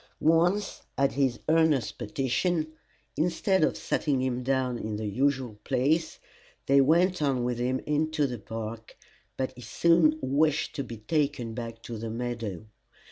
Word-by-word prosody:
Once 175 +6 +2 0.2
at 140 0 +3
his 135 -4 0
earnest 155 -9 +2
petition, 135 - 0 0.5
instead 180 +3 +1
of - - +1
setting 140 -4 0
him 130 -1 -1
down 130 -1 0
in 110 -1 -4
the 110 +1 -4
usual 125 0 0
place, 145 +5 +1 0.5
they 140 0 +5
went 175 +5 +3
on 135 -4 +1
with 120 -1 -1
him 125 +1 0
into 150 0 +1
the 125 -4 -4
park, 110 +1 -7 0.4
but 130 0 -1
he 125 - -11
soon 155 +6 +3
wished 150 +2 +1
to 140 - -2
be 115 -3 -8
taken 140 -1 -1
back 115 -1 -7
to 115 -2 -6
the 115 +1 -4
meadow. 115 -4 -4
130 Hz, 150 wpm, -28 LUFS, 120-155 Hz, 0.5 s, they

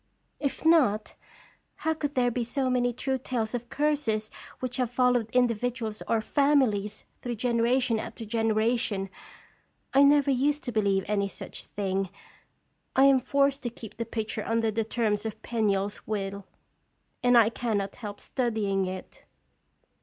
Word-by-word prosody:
"If 280 +2 -3
not, 260 -11 +4 0.6
how 320 - 0
could 295 -2 -4
there 245 -1 +3
be 240 +1 -1
so 255 +2 -1
many 245 -1 +2
true 265 +2 -2
tales 230 -3 -2
of 240 0 -4
curses 270 -7 0 0.3
which 250 -1 -3
have 250 -3 0
followed 245 -2 +2
individuals 235 -2 0
or 225 - +2
families 220 -7 +1 0.2
through 245 -1 -3
generation 235 0 +1
after 225 - -6
genera 225 +1 +2
tion. 195 -4 -2 0.8
I 275 - +6
never 280 0 +5
used 285 +3 +1
to 245 - -3
believe 200 -3 +1
any 200 -1 +1
such - - -8
thing. 195 -1 -2 0.9
I 265 - +6
am 275 -1 +6
forced 280 +2 +1
to 245 - -2
keep 220 -2 -11
the 230 - -2
picture 220 -1 -3
under 225 -1 +1
the 225 +1 0
terms 215 -2 0
of 220 -1 -5
Penniel's 205 -3 -1
will, 200 -2 -3 0.7
and 245 0 +5
I 225 -2 +6
cannot 210 -5 -2
help 210 -4 -7
studying 210 -6 -1
it." 185 - -7
230 Hz, 150 wpm, -28 LUFS, 215-255 Hz, 0.9 s, I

